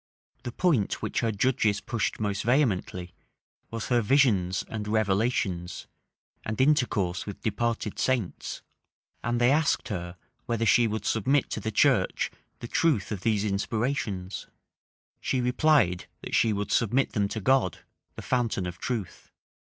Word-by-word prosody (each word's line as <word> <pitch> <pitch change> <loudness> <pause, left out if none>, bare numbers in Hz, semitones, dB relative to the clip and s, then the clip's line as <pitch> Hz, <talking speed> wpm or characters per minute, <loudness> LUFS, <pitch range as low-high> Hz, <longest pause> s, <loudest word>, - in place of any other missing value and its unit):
The 120 -1 -5
point 145 - +1
which - - -1
her 115 - +1
judges 105 -2 +1
pushed 115 -2 -2
most 100 -2 -1
vehemently, 100 -8 0 0.6
was 115 -1 -5
her 120 -1 +3
visions 105 -7 +3
and 105 -2 -5
revelations, 100 -4 0 0.6
and 110 0 -4
intercourse 125 -11 +1
with 100 - -8
departed 115 -1 -1
saints; 125 -9 -2 0.6
and 120 +1 0
they 120 +2 +4
asked 155 0 +1
her, 90 -3 -5 0.3
whether 115 -1 0
she 120 +1 +5
would 110 -1 -3
submit 130 +6 +1
to - - -2
the 110 - -3
church 105 - +2 0.3
the 120 - -5
truth 130 - +1
of 100 -3 -3
these 105 -1 +1
inspirations: 105 -2 -2 0.7
she 130 - -1
replied, 125 - +2
that - - -8
she 115 - +4
would 105 0 -2
submit 120 +4 +2
them 105 -3 +1
to 110 - -4
God, 130 -3 +2 0.3
the - - -8
fountain 120 -7 0
of 90 0 -6
truth. 115 -7 -5
110 Hz, 140 wpm, -27 LUFS, 100-125 Hz, 0.7 s, she